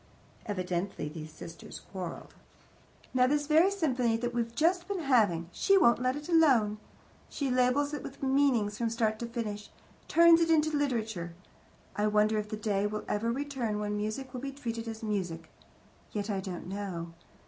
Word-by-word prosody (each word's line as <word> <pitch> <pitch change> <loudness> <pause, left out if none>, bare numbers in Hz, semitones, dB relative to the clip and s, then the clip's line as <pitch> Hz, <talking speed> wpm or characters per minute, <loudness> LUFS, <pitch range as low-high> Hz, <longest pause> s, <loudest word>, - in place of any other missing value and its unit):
Evidently 185 -4 -2
these 155 0 -8
sisters 165 +2 -10
quarrelled. 180 -3 -6 0.8
"Now, 255 0 +4
this 290 +2 +1
very 320 +5 +5
symphony 255 -12 +1
that 240 +1 -3
we've 235 -1 -2
just 350 +5 +2
been 395 -3 -2
having 210 - +2
she 390 - +3
won't 235 -9 +4
let 255 +1 +1
it 295 0 -7
alone. 260 -11 +4 0.5
She 275 -3 -2
labels 255 +4 +2
it 295 - -3
with 275 - -9
meanings 265 -7 +2
from 230 -1 +1
start 220 -2 0
to 235 - -4
finish; 215 -3 -5 0.4
turns 335 0 +6
it 330 - +2
into 310 -1 +3
literature. 220 -11 -2 0.6
I 210 +1 +1
wonder 215 +1 +3
if 210 0 -5
the 215 - -4
day 205 -1 0
will 210 0 -5
ever 230 +3 0
return 260 -5 -2
when 210 0 -2
music 215 +5 -4
will 250 - -5
be 275 0 -4
treated 230 -4 -5
as 225 0 -6
music. 175 -7 -3 0.6
Yet 210 0 -3
I 195 - -1
don't 185 -2 -6
know. 180 -4 -5
230 Hz, 170 wpm, -30 LUFS, 205-275 Hz, 0.8 s, turns